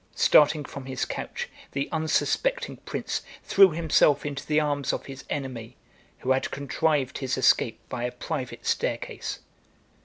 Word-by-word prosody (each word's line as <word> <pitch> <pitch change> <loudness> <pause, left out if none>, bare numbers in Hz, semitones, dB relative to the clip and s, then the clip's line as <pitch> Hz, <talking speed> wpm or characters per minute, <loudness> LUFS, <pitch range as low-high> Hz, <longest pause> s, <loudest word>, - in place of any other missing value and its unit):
Starting 150 0 +5
from 135 -1 -8
his 130 -2 -2
couch, - - -5 0.3
the 140 0 -1
unsuspecting 330 - 0
prince - - -3 0.2
threw 195 -1 +7
himself 155 -3 +3
into 140 -2 -4
the 155 0 +3
arms 145 -2 0
of - - -4
his 135 -1 -9
enemy, 130 -5 -5 0.5
who 130 - 0
had 130 0 +2
contrived 140 -1 0
his 130 -1 -1
escape 125 -2 +3
by 120 - -4
a 125 - -1
private - - -5
staircase. - - -2
140 Hz, 145 wpm, -26 LUFS, 130-155 Hz, 0.5 s, threw